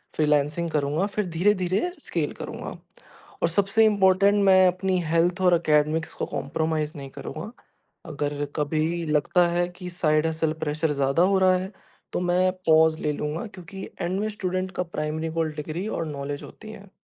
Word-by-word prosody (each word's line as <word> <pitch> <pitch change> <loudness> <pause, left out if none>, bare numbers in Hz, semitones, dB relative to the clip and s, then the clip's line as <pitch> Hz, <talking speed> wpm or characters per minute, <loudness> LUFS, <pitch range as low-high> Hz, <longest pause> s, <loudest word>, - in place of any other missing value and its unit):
Freelancing 150 +2 +1
करूँगा 150 +3 0
फिर 210 - 0
धीरे-धीरे 190 - +2
स्केल - - -2
करूँगा। - - -6 0.7
और - - +5
सबसे 200 +5 +2
इम्पोर्टेंट 200 0 +4
मैं 185 -1 +6
अपनी 185 0 0
हेल्थ 170 +3 +1
और 180 -1 +5
एकेडेमिक्स 155 0 +1
को - - -3
कोम्प्रोमाईज़ 155 +1 -2
नहीं 140 -1 -7
करूँगा। 155 +9 -7 0.5
अगर 145 -2 -3
कभी 160 +3 -1
लगता 170 +4 +2
है 175 0 +1
कि 180 -1 -6
साइड 155 -3 +1
हसल 160 -1 0
प्रेशर 155 +1 0
ज़्यादा 140 +4 +2
हो 195 +1 +3
रहा 185 -1 +5
है 185 +2 -5 0.4
तो - - 0
मैं 180 +1 +2 0.2
पॉज 160 0 +5
ले 150 - 0
लूँगा। 150 +7 -3
क्योंकि 190 0 -10 0.2
एंड 185 +2 -1
में 215 - -1
स्टूडेंट 185 -2 -3
का 180 - 0
प्राइमरी 160 -1 -3
गोल 160 -1 0
डिग्री 155 +6 -4
और 165 - -1
नॉलेज 145 -1 -5
होती 215 0 -11
है। 200 -2 -12
170 Hz, 165 wpm, -25 LUFS, 155-185 Hz, 0.7 s, मैं